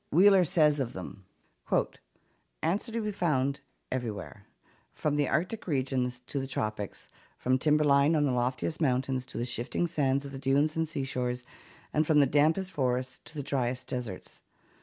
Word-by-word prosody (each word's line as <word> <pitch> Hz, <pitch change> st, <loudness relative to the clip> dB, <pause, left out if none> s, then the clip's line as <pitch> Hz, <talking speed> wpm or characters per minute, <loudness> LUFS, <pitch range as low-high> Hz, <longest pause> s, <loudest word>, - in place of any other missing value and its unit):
Wheeler 190 Hz, +1 st, +6 dB
says 155 Hz, -4 st, +3 dB
of 125 Hz, -3 st, -2 dB
them: 95 Hz, +1 st, -8 dB, 1.4 s
"Ants 190 Hz, +9 st, +1 dB
are -, -, -8 dB
to 230 Hz, 0 st, -2 dB
be 210 Hz, -, -1 dB
found 140 Hz, -8 st, 0 dB, 0.3 s
everywhere, 110 Hz, -4 st, -5 dB, 0.4 s
from 150 Hz, -1 st, -1 dB
the 145 Hz, -2 st, +2 dB
arctic 185 Hz, +8 st, -1 dB
regions 130 Hz, -4 st, -1 dB
to 140 Hz, -, -3 dB
the 135 Hz, -, -3 dB
tropics, 105 Hz, -5 st, -3 dB, 0.3 s
from 130 Hz, +1 st, +1 dB
timberline 150 Hz, 0 st, +4 dB
on 150 Hz, -1 st, +3 dB
the 140 Hz, -, +1 dB
loftiest 125 Hz, +6 st, -1 dB
mountains 130 Hz, -2 st, 0 dB
to -, -, -8 dB
the 120 Hz, -, -1 dB
shifting 120 Hz, +7 st, -1 dB
sands 140 Hz, -4 st, 0 dB
of 140 Hz, -, -7 dB
the 135 Hz, -, -6 dB
dunes 140 Hz, +3 st, +2 dB
and 160 Hz, -1 st, 0 dB
sea 140 Hz, -3 st, -3 dB
shores, 125 Hz, -2 st, -2 dB, 0.5 s
and 155 Hz, 0 st, +2 dB
from 150 Hz, -2 st, +5 dB
the 140 Hz, -, +6 dB
dampest 160 Hz, +7 st, +2 dB
forests 130 Hz, -3 st, -1 dB
to 160 Hz, -, -11 dB
the 145 Hz, -, -3 dB
driest 130 Hz, -3 st, -1 dB
deserts. 120 Hz, -7 st, -6 dB
140 Hz, 170 wpm, -29 LUFS, 125-155 Hz, 1.4 s, Wheeler